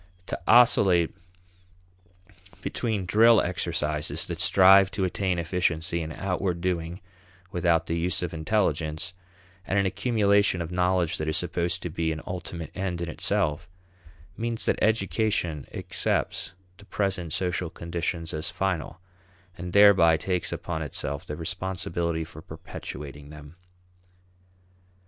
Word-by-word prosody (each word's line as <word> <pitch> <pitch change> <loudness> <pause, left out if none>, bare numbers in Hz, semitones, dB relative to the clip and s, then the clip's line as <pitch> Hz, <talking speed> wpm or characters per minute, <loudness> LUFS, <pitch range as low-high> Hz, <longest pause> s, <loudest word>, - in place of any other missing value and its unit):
To - - -5
oscillate 95 -8 +5 1.5
between 110 -6 -2
drill 110 +5 +6
exercises 80 -4 -1
that - - -5
strive 95 0 +6
to 100 - -1
attain 95 0 0
efficiency 85 0 0
in 80 0 -5
outward 90 0 -2
doing 85 0 -2 0.5
without 85 -2 +2
the 85 +1 -2
use 90 +1 0
of 85 -1 -3
intelligence, 80 -2 -1 0.5
and 95 +3 -1
an 100 - +3
accumulation 100 -2 +2
of 85 0 -4
knowledge 90 -1 +1
that 80 - -2
is 80 +1 0
supposed 85 +1 -1
to 85 - -4
be 80 0 -1
an 80 - -4
ultimate 90 -3 -6
end 95 -3 -2
in 85 -1 -3
itself, 85 +1 -1 0.7
means 115 0 -3
that - - 0
education 105 - 0
accepts - - -2 0.3
the 100 - -14
present 95 -5 -2
social 90 0 -1
conditions 85 0 -4
as 75 0 -3
final, 90 -4 -2 0.6
and 90 +1 -6
thereby 95 -5 +6
takes 90 +1 -2
upon 80 -2 -4
itself 70 -1 -5
the 75 - -4
responsibility 85 -1 -2
for 80 -1 -11
perpetuating 75 -2 -9
them. 75 +1 -12
85 Hz, 125 wpm, -26 LUFS, 80-95 Hz, 1.5 s, drill